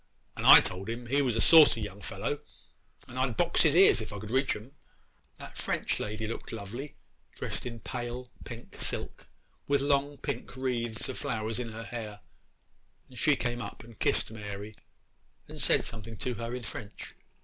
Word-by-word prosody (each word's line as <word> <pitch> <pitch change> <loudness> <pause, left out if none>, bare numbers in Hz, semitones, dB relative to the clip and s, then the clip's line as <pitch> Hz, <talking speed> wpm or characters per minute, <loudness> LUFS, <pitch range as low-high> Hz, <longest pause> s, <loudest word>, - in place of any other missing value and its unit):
And - - -1
I - - +12
told 95 +3 -5
him 120 +1 -4
he 140 +4 +2
was 125 -5 +1
a - - +1
saucy 145 -10 +7
fellow, 110 +8 -3 0.7
and 130 0 -6
I'd 130 -4 0
box 170 -1 +3
his 155 -2 +5
ears 185 -9 +7
if 110 - -6
I 100 - -5
could 105 +2 -7
reach 130 +2 +2
them. 110 +5 -9 0.7
'That - - -9
French - - 0
lady 110 +1 -3
looked 115 - -5
lovely, 115 +7 -6 0.4
dressed - - -3
in 115 -2 -7
pale 125 +1 -5
pink 120 -1 -9
silk, - - -3 0.4
with 140 0 +3
long 140 0 +1
pink - - -5
wreaths 120 -3 -1
of - - -4
flowers 110 +1 -1
in 120 -2 -4
her 115 +1 -6
hair; 110 -4 -6 0.9
and 125 -2 -9
she 150 +2 +4
came 120 -1 -2
up 100 - -7
and 115 -2 -15
kissed - - +1
Mary, 105 -1 -7 0.7
and - - -6
said - - +3
something 115 0 -6
to 125 - -2
her 115 +1 -4
in 125 - -6
French. 105 -1 -8
115 Hz, 180 wpm, -30 LUFS, 110-130 Hz, 0.9 s, I